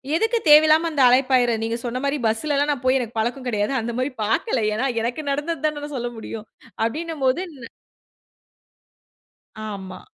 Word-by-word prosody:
எதுக்கு 450 +7 +1
தேவையில்லாம 310 +2 +7
அந்த 290 - 0
அழைப்பாயிற 255 -1 +4
நீங்க 230 +1 -2
சொன்ன 245 +1 -2
மாரி 280 +1 0
பஸ்லலாம் 285 +6 +1
நான் 270 -4 -4
போய் 255 +1 +4
எனக்கு 235 -2 -5
பழக்கம் 245 +4 -2
கிடையாது, 210 +1 0
அந்த 235 +1 -3
மாரி 255 +3 -1
பார்க்கல, 230 - 0
ஏனா 220 +6 -1 0.2
எனக்கு 240 +6 -2
நடந்தது 295 +2 -2
தானே 305 -1 0
நான் 290 -1 -6
சொல்ல 240 0 -3
முடியும் 220 0 -7 0.4
அப்டினும் 315 +4 -4
போது 260 +7 +2
நா 240 -4 -11 2.0
ஆமா. 190 -3 -7
255 Hz, 160 wpm, -22 LUFS, 230-295 Hz, 2.0 s, தேவையில்லாம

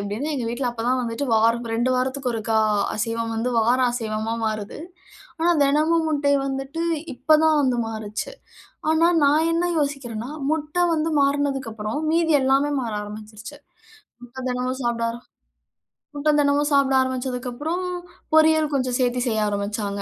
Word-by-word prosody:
எப்டின்னா 210 +10 -3
எங்க 245 - -2
வீட்டில 245 +1 -2
அப்போ 225 - -5
தான் 255 - +1
வந்துட்டு 235 +4 -3
வாரம் 230 +2 +2
2 240 +3 +1
வாரத்துக்கு 260 0 -1
ஒருக்கா 220 0 0 0.4
அசைவம் 230 +1 -2
வந்து 235 +3 -1
வாரம் 245 +3 +3
அசைவமா 225 -1 -2
மாறுது. 215 +1 -4 0.6
ஆனா, 340 - +3
தினமும் 310 +4 +2
முட்டை 285 -2 +1
வந்துட்டு 270 +4 -3 0.3
இப்போ 280 +5 +1
தான் 315 -1 +4
வந்து 255 -3 +1
மாறிச்சு. 220 - -5 0.6
ஆனா 325 +1 +4 0.2
நான் 305 +3 +4
என்ன 335 +1 +1
யோசிக்கிறேன்னா, 265 -5 -3 0.2
முட்ட 305 0 -3 0.2
வந்து 320 0 0
மாறினதுக்கு 275 -3 0
அப்புறம் 215 +5 -4
மீதி 330 0 +2
எல்லாமே 270 +2 +2
மாற 230 -3 -4
ஆரம்பிச்சுடுச்சு. 215 +5 -9 0.7
முட்டை 245 +2 -10
தினமும் 255 +1 -2
சாப்பிட 235 -1 -1
ஆர - - -6 1.0
முட்டை 300 +1 +2
தினமும் 290 0 +2
சாப்பிட 275 -1 +3
ஆரம்பிச்சதுக்கப்புறம், 260 +6 -3 0.5
பொரியல் 315 -1 +4
கொஞ்சம் 255 -2 0
சேர்த்து 245 0 +1
செய்ய 215 -2 +1
ஆரம்பிச்சாங்க. 200 0 -3
255 Hz, 145 wpm, -23 LUFS, 225-290 Hz, 1.0 s, தான்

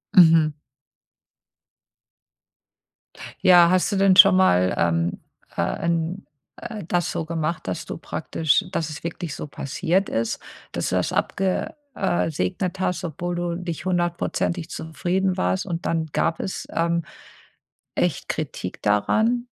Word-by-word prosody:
Mhm. 160 -3 +7 2.9
Ja, 175 -2 +7
hast 185 +3 +2
du - - 0
denn 195 -1 +4
schon 195 +1 +9
mal, 90 - +4
ähm, 85 0 +1 0.4
äh, - - +2 0.2
'n 170 -1 -1 0.3
äh, 220 -4 -7
das 175 -1 0
so 165 - -3
gemacht, 160 - -3
dass 90 - -3
du - - -5
praktisch 160 +5 0
dass 160 -4 -2
es 150 - -8
wirklich 170 -2 -5
so - - -6
passiert 175 +7 -1
ist, 115 0 -1 0.3
dass - - -2
du - - -1
das - - 0
abge 190 -1 -1 0.2
äh, 175 -4 0
segnet 165 - -2
hast, 180 -1 -1
obwohl 175 +1 -3
du 175 -1 -2
nicht 175 -1 -5
hundertprozentig 175 -1 -1
zufrieden 180 +4 -1
warst 90 +1 0
und 170 +2 -4
dann 165 -1 0
gab 165 - 0
es, 190 - -4
ähm, 170 0 +1 0.9
echt - - -1
Kritik 90 - -4
daran? 220 - +2
170 Hz, 135 wpm, -23 LUFS, 155-185 Hz, 2.9 s, schon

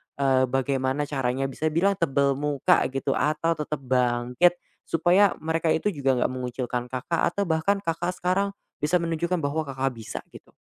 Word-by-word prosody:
eee, 135 -2 +2
bagaimana 135 +2 0
caranya 135 -1 -1
bisa 155 +4 -2
bilang 190 +5 +1
tebel 140 -3 +2
muka 145 -2 +2
gitu, 135 0 -2
atau 155 +3 +1
tetap 150 -2 -4
bangkit? 125 +6 +2 0.3
Supaya 180 +4 +3
mereka 160 +1 0
itu 160 - +1
juga 135 -1 +1
nggak 125 - +1
mengucilkan 125 -1 -3
Kakak, 135 +6 -2
atau 200 +3 -1
bahkan 165 +5 +1
Kakak 175 -1 -2
sekarang, 185 +3 0 0.3
bisa 175 +4 +3
menunjukkan 170 +1 -1
bahwa 155 +2 -1
Kakak 135 -2 -2
bisa 110 -2 -6
gitu. - - -16
145 Hz, 160 wpm, -25 LUFS, 130-170 Hz, 0.3 s, Supaya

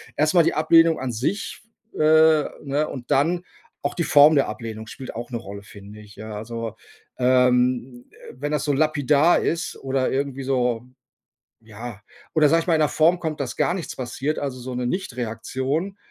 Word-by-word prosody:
erstmal 155 +3 +3
die - - +2
Ablehnung 165 +1 +4
an 130 -2 -3
sich, 135 - -3 0.3
äh, - - -11 0.7
ne, 145 +2 -1
und 125 -3 -8
dann 170 +6 +2 0.4
auch 140 0 -2
die 170 - 0
Form 150 +2 +6
der 140 - +3
Ablehnung 110 0 -7
spielt 130 - -8
auch 120 +1 -6
'ne 120 - -2
Rolle, 100 -2 -9
finde 100 +1 -13
ich, 105 -1 -15
ja, 110 0 -7
also, 115 0 -6 0.4
ähm, 125 0 +2 0.2
äh, - - -11
wenn 145 +2 -3
das 150 - 0
so 150 - 0
lapidar 150 +2 +3
ist 170 +1 -2
oder 135 -1 0
irgendwie 135 0 -2
so, 125 -3 0 0.8
ja 110 -1 -9 0.3
oder 155 -2 +5
sage 165 +1 +4
ich - - -10
mal 165 - +3
in 155 - +1
'ner 150 - +3
Form 165 +3 +3
kommt, 160 -3 -4
dass 125 -4 -3
gar - - +1
nichts 180 -3 -5
passiert, 130 +4 -3
also 135 -3 -4
so 125 +1 -6
'ne 125 0 -2
Nichtreaktion. 130 - -3
130 Hz, 185 wpm, -23 LUFS, 120-155 Hz, 0.8 s, Form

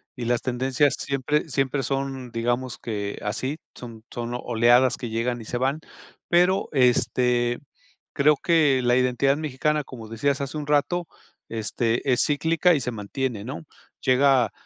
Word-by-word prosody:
y 125 -3 -5
las 120 0 0
tendencias 130 +3 +1
siempre 140 +3 -1
siempre 135 0 0
son 135 -1 -3
digamos 120 +2 -2
que 100 -3 -4
así, 130 +8 -2 0.2
son 115 -3 -10
son 120 0 -4
oleadas 120 +2 +3
que 120 - -5
llegan 120 +2 -2
y 110 - -10
se 120 - -3
van. 135 +4 0 0.5
Pero, 180 +2 +3
este, 125 -2 +2 0.6
creo 150 +2 +4
que 150 -5 +3
la 120 0 +3
identidad 130 +2 +2
mexicana, 150 0 -1
como 120 -5 -10
decías 140 +6 -1
hace 140 +2 -4
un 145 - -6
rato, 165 +4 +1 0.4
este, 115 +2 -1
es 125 - +2
cíclica 165 +4 +2
y - - 0
se 125 - -3
mantiene, 115 +1 -4
¿no? 135 +7 -7 0.4
Llega, 130 -4 +3
130 Hz, 150 wpm, -24 LUFS, 120-140 Hz, 0.6 s, creo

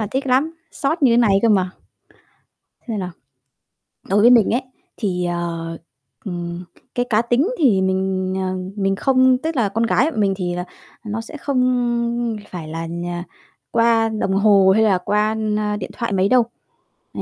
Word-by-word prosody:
là 215 - -1
thích 270 +1 -2
lắm, 275 +6 +1 0.2
xót 310 +3 -2
như 255 -4 +5
thế - - +4
này 215 -5 +4
cơ 230 - +4
mà. 190 -4 +2 1.2
Xem 220 -3 -2
nào? 180 -1 -4 1.0
Đối 200 +2 +3
với 235 +3 +7
mình 235 -4 +5
ấy, 245 +3 +1 0.3
thì, 180 -5 -2
ờ, 170 -1 -3 0.5
ừm, 175 -1 -5 0.3
cái 245 - 0
cá 215 0 +3
tính 240 - +1
thì 235 - +4
mình, 190 0 -1
ờ, 185 0 -2 0.3
mình 195 0 +1
không 260 +1 +3
tức 320 +3 -3
là 230 -5 +2
con 225 +4 0
gái 265 +7 +2
bọn 220 - -3
mình 195 -2 +2
thì 175 -2 -2
là, 180 0 -3 0.4
nó 210 +1 -3
sẽ 225 +7 -9
không 240 -4 0
phải 165 -4 -7
là 165 +1 -5
nh 170 +1 -5 0.7
qua 230 -1 +3
đồng 215 -3 -2
hồ 195 -1 +5
hay 220 - +3
là 200 -4 +3
qua, 210 +4 0
na, 210 -1 -1
điện 205 - -6
thoại 235 -3 -4
mấy 190 0 +2
đâu. 250 +1 +5 0.7
È - - -5
215 Hz, 180 wpm, -20 LUFS, 190-240 Hz, 1.2 s, với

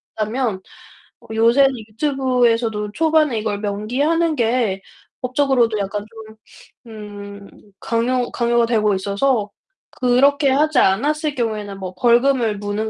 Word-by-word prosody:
다면 220 -2 -2 0.7
요새는 235 +5 +4 0.2
유튜브에서도 235 -4 0
초반에 310 -3 +2
이걸 210 -2 -3
명기하는 265 +11 0
게 230 -5 0 0.4
법적으로도 250 -3 +1
약간 205 +1 -4
좀 220 -1 -13 0.5
음 205 -2 -10 0.3
강요 245 +2 -1
강요가 235 -1 +1
되고 215 -3 +1
있어서 205 +3 0 0.4
그렇게 275 +3 +2
하지 295 +1 +2
않았을 295 +10 +1
경우에는 210 -4 -3
뭐 185 -1 -6
벌금을 240 0 +2
무는 205 +2 -3
230 Hz, 270 characters per minute, -19 LUFS, 210-265 Hz, 0.7 s, 요새는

